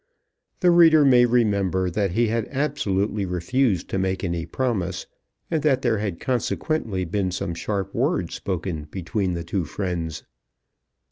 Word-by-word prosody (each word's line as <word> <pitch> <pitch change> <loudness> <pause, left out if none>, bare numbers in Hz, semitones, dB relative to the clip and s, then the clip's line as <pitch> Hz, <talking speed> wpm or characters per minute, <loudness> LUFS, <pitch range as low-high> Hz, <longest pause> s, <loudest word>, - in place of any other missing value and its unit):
The 180 -2 +5
reader 160 -3 +6
may 125 -2 +6
remember 100 -6 +1
that 100 -1 0
he 115 +2 +2
had 115 -1 -1
absolutely 110 -8 -1
refused 95 +3 0
to 95 - -1
make 95 +1 -1
any 85 -3 -2
promise, 95 -9 -2 0.5
and 160 -2 +1
that 135 -3 +2
there 115 -4 +2
had 100 -5 -3
consequently 120 - -1
been 95 +2 -1
some 90 -1 -3
sharp 95 +2 -3
words - - 0
spoken 90 -5 -3
between 90 +4 -2
the 85 - -4
two 90 +2 -2
friends. 85 -2 -4
100 Hz, 145 wpm, -24 LUFS, 90-120 Hz, 0.5 s, reader